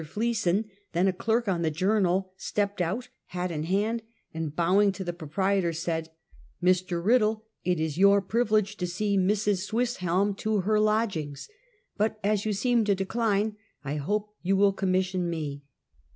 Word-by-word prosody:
Fleeson, 210 Hz, +2 st, 0 dB, 0.3 s
then 175 Hz, +3 st, +2 dB
a 190 Hz, -, +2 dB
clerk 225 Hz, +5 st, 0 dB
on 180 Hz, -3 st, 0 dB
the 160 Hz, -, +1 dB
Journal, 185 Hz, +2 st, +1 dB
stepped 200 Hz, 0 st, -2 dB
out, 210 Hz, +9 st, -2 dB, 0.2 s
hat 180 Hz, 0 st, -3 dB
in 155 Hz, -1 st, -3 dB
hand, 210 Hz, +6 st, 0 dB, 0.3 s
and 160 Hz, -2 st, -4 dB
bowing 190 Hz, +5 st, +3 dB
to 195 Hz, -, -5 dB
the 175 Hz, -1 st, -3 dB
proprietor, 175 Hz, +2 st, 0 dB
said: 165 Hz, -1 st, -3 dB, 0.3 s
" -, -, -23 dB
Mr. 180 Hz, -1 st, 0 dB
Riddle, 220 Hz, -1 st, +3 dB, 0.2 s
it 180 Hz, -2 st, +1 dB
is 160 Hz, 0 st, -2 dB
your 200 Hz, +1 st, +6 dB
privilege 215 Hz, 0 st, +1 dB
to 180 Hz, -, -2 dB
see 200 Hz, +3 st, -1 dB
Mrs. 200 Hz, +1 st, +2 dB
Swiss, 235 Hz, +4 st, -1 dB
helm 185 Hz, +3 st, +1 dB
to 215 Hz, -1 st, 0 dB
her 210 Hz, +3 st, +2 dB
lodgings, 210 Hz, -10 st, 0 dB, 0.5 s
but 215 Hz, +1 st, 0 dB
as 210 Hz, +1 st, +1 dB
you -, -, +1 dB
seem 235 Hz, +3 st, +2 dB
to 205 Hz, -1 st, +3 dB
decline, 210 Hz, +1 st, 0 dB, 0.3 s
I 145 Hz, +1 st, -3 dB
hope 210 Hz, +8 st, -2 dB
you 190 Hz, +2 st, +1 dB
will 200 Hz, 0 st, +4 dB
commission 185 Hz, -2 st, 0 dB
me." 150 Hz, -4 st, -4 dB
195 Hz, 165 wpm, -27 LUFS, 175-215 Hz, 0.5 s, your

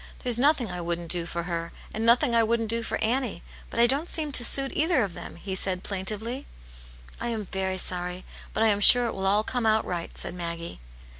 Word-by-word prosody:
There's 240 Hz, -2 st, +4 dB
nothing 265 Hz, -6 st, +2 dB
I 180 Hz, 0 st, -5 dB
wouldn't 170 Hz, -1 st, -3 dB
do 175 Hz, -2 st, 0 dB
for 170 Hz, 0 st, -4 dB
her, 170 Hz, -1 st, -4 dB, 0.2 s
and 220 Hz, -, -3 dB
nothing 235 Hz, +3 st, +4 dB
I 230 Hz, -, +4 dB
wouldn't 225 Hz, 0 st, +1 dB
do 230 Hz, 0 st, -1 dB
for 230 Hz, -, -3 dB
Annie; 235 Hz, -4 st, -1 dB, 0.3 s
but -, -, -5 dB
I 235 Hz, -, +7 dB
don't 280 Hz, +7 st, 0 dB
seem 305 Hz, -2 st, -1 dB
to 250 Hz, -, +5 dB
suit 270 Hz, +3 st, +3 dB
either 310 Hz, -4 st, +2 dB
of 195 Hz, -4 st, -4 dB
them," -, -, -9 dB
he 190 Hz, +3 st, -6 dB
said, 185 Hz, -1 st, 0 dB
plaintively. 215 Hz, +7 st, -4 dB, 0.4 s
" -, -, -19 dB
I -, -, -2 dB
am 225 Hz, -3 st, -3 dB
very 190 Hz, 0 st, -3 dB
sorry; 180 Hz, 0 st, -2 dB, 0.3 s
but 220 Hz, -, 0 dB
I 225 Hz, -, +5 dB
am 205 Hz, -1 st, +2 dB
sure 245 Hz, +4 st, +8 dB
it 230 Hz, -, -2 dB
will 190 Hz, 0 st, -3 dB
all 205 Hz, +2 st, +3 dB
come 245 Hz, 0 st, -2 dB
out 220 Hz, 0 st, +2 dB
right," 170 Hz, -2 st, -5 dB
said -, -, -2 dB
Maggie. 170 Hz, -, -6 dB
215 Hz, 230 wpm, -26 LUFS, 180-240 Hz, 0.4 s, sure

